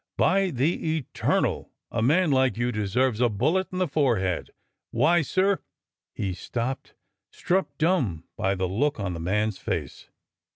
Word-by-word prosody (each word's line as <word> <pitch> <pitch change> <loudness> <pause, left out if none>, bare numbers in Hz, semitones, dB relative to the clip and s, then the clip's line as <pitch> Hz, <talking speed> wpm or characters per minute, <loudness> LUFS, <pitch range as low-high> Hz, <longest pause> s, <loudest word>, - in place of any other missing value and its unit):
By 195 0 +3
the 155 +3 0
Eternal! 140 - -1 0.2
a 115 - -1
man 155 +7 +3
like 130 -4 +2
you 120 +1 0
deserves 110 +3 0
a 120 - +4
bullet 155 - +1
in 185 - -4
the 185 -1 +1
forehead! 120 - 0 0.4
Why, 155 +9 +3
sir—" 190 +6 +1 0.6
He 95 -2 -2
stopped, 120 +8 -4 0.3
struck 190 +2 -1
dumb 140 - +1
by 95 +1 0
the 95 -1 -1
look 135 +9 0
on 100 -3 -2
the 85 - -5
man's 105 +4 0
face. 80 -7 -4
125 Hz, 150 wpm, -26 LUFS, 100-160 Hz, 0.6 s, a